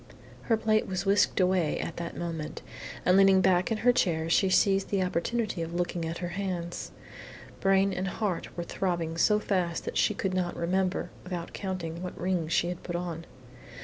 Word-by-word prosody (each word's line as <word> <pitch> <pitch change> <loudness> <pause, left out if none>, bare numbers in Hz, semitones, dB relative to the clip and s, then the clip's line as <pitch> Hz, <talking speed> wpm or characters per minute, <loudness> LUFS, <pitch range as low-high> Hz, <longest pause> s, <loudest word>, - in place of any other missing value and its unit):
Her 225 - +4
plate 215 0 +1
was 185 0 -3
whisked 200 +1 +3
away 180 -4 +2
at 165 - -4
that 170 0 -5
moment, 165 -3 -5 0.4
and 180 - +5
leaning 195 -1 +6
back 185 +1 +3
in 225 - +1
her 245 - +7
chair 165 -7 +1
she 190 +3 +4
seized 195 +1 +3
the 195 -2 +1
opportunity 185 +3 -1
of 165 +1 -4
looking 175 -1 -1
at 165 +1 -3
her 175 0 -4
hands. 175 -2 -4 0.7
Brain 195 0 +3
and 185 +1 -2
heart 190 -2 -2
were 175 - -2
throbbing 170 -3 -2
so 210 +5 +4
fast 180 -5 -1
that - - -3
she 210 - +2
could 190 -1 -2
not 180 -2 -1
remember, 185 +2 0
without 175 -2 -5
counting, 175 -3 -4
what 180 - -6
rings 175 -3 -1
she 175 - +2
had 180 -1 -5
put 175 - -5
on. 170 -2 -4
180 Hz, 185 wpm, -28 LUFS, 170-195 Hz, 0.7 s, her